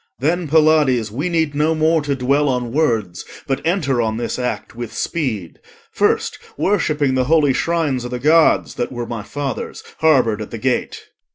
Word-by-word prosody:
Then, 165 +5 0
Pylades, 150 -7 +3
we 145 +11 -2
need 160 -3 0
no 155 +3 +1
more 160 +1 +2
to 145 -1 -1
dwell 140 +3 +1
On 125 -2 -1
words, 115 - 0 0.2
but 135 -1 -2
enter 150 -7 +1
on 110 -1 -1
this 120 - -3
act 125 -1 -4
with 120 -1 -6
speed, 110 - -3 0.3
First - - 0 0.2
worshipping 155 -8 +1
the 130 -1 +1
holy 150 -1 +3
shrines 155 -5 0
o' 125 - -5
the 125 - -3
Gods 155 +5 +3
That 120 - -3
were 120 -1 -4
my 115 -2 -5
father's, 140 +3 -5 0.2
harboured 130 -9 +3
at 105 - -6
the 115 - -6
gate. 125 +3 -2
135 Hz, 175 wpm, -19 LUFS, 120-155 Hz, 0.3 s, Pylades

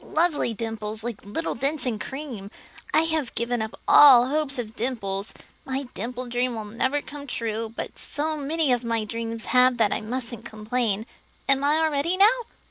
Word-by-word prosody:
"Lovely 315 -6 +2
dimples, 220 -1 -3
like 235 -3 -5
little 215 +12 -3
dents 275 +2 -1
in 230 -4 -1
cream. 260 -9 -6 0.4
I 315 - +4
have 315 -5 0
given 235 0 0
up 220 0 -5
all 255 -4 +8
hope 290 -2 0
of 225 -3 -5
dimples. 210 -4 -3 0.3
My 270 +1 -2
dimple 245 +4 -4
dream 245 0 -1
will 220 -1 -5
never 260 +7 -1
come 285 -1 -9
true; 225 -2 -3
but - - -6
so 310 +1 -2
many 300 0 0
of 245 -1 +2
my 230 -1 -1
dreams 230 +1 -4
have 250 0 +5
that 220 -3 +3
I - - -2
mustn't 235 0 -4
complain. 220 -1 -2 0.4
Am 275 0 +3
I 295 +2 +4
all 315 - +2
ready 305 +6 0
now?" 395 - +8
245 Hz, 180 wpm, -25 LUFS, 225-285 Hz, 0.4 s, all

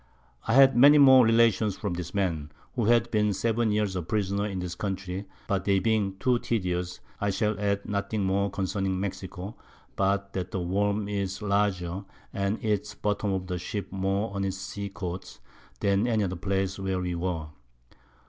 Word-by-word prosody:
I 115 - +2
had 135 0 +7
many 140 +5 +8
more 130 -3 +8
Relations 115 -3 +3
from 100 -4 -3
this 85 -1 -5
Man, 80 -7 -1 0.2
who 120 -4 0
had 120 +1 +3
been 105 -1 +2
7 115 +2 +1
Years 105 -2 0
a 90 - -1
Prisoner 100 +3 -1
in 100 -2 -4
this 90 -1 -3
Country; 95 0 -4 0.2
but 100 -1 0
they 100 -1 +3
being 100 -1 +1
too 125 +3 +2
tedious, 90 -6 -2 0.2
I 100 - 0
shall 105 +2 0
add 100 -1 -1
nothing 100 +1 -1
more 100 +1 +1
concerning 95 -1 -2
Mexico, 95 +1 -5 0.4
but 100 0 0
that 90 -1 -3
the 95 - -3
Worm 100 +3 0
is 100 0 -3
larger, 100 -3 0 0.3
and 100 +2 0
eats 105 -2 -1
the - - -32
Bottoms 105 -1 0
of 95 -1 -3
the 90 -1 -3
Ships 100 +2 -5
more 95 +2 -1
on 100 0 -2
its 95 -1 -2
Sea 100 +1 -5
Coasts, 90 -1 -6 0.4
than 100 +3 +2
any 110 -3 +2
other 95 -1 -2
Place 95 +1 -1
where 95 -1 -1
we 90 -1 -2
were. 85 -3 -3
100 Hz, 180 wpm, -27 LUFS, 95-105 Hz, 0.4 s, many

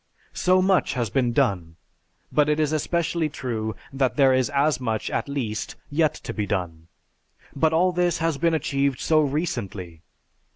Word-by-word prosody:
So 185 0 +3
much 190 -1 +2
has 120 -4 -2
been 125 -3 +1
done; 95 - 0 0.6
but 150 0 +3
it 150 +1 +1
is 155 0 +1
especially 165 0 0
true 110 -6 -4 0.2
that 135 -2 0
there 135 -3 +5
is 130 0 +2
as 145 -1 +1
much, 115 -4 -2
at - - -2
least, 115 -6 -3 0.2
yet 155 0 +2
to - - -4
be 105 -2 -2
done. 85 -4 -3 0.7
But 155 +3 +2
all 175 +3 +3
this 175 -1 +1
has 165 -3 -1
been 165 -1 +2
achieved 140 -3 0
so 155 +1 +3
recently. 110 - -3
140 Hz, 165 wpm, -24 LUFS, 115-155 Hz, 0.7 s, there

